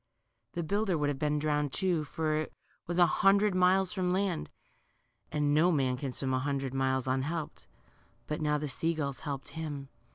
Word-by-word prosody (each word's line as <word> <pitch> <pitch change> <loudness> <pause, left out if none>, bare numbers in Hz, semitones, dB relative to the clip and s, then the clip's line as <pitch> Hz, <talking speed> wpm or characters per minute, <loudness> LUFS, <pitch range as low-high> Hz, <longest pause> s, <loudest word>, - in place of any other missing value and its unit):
The 170 - -2
builder 200 +1 0
would 145 -1 +1
have 140 -2 -3
been 150 0 +1
drowned, 150 -1 0
too, 180 -3 +1
for 155 +1 -1
it 155 - -3 0.4
was 175 +1 -2
a 175 - +7
hundred 200 +4 +4
miles 185 +1 +3
from 185 -3 0
land, 185 -2 0 0.8
and 145 -1 +1
no 165 +4 +5
man 135 -5 +1
can 130 +1 -4
swim 130 +1 -1
a 130 - +2
hundred 135 -1 -2
miles 130 -1 0
unhelped. 145 +5 -2 0.6
But 150 +5 -3
now 150 -1 +2
the 150 0 -3
sea 165 +4 0
gulls 140 -3 -3
helped 140 -3 -5
him. 145 -4 -5
150 Hz, 185 wpm, -31 LUFS, 140-175 Hz, 0.8 s, a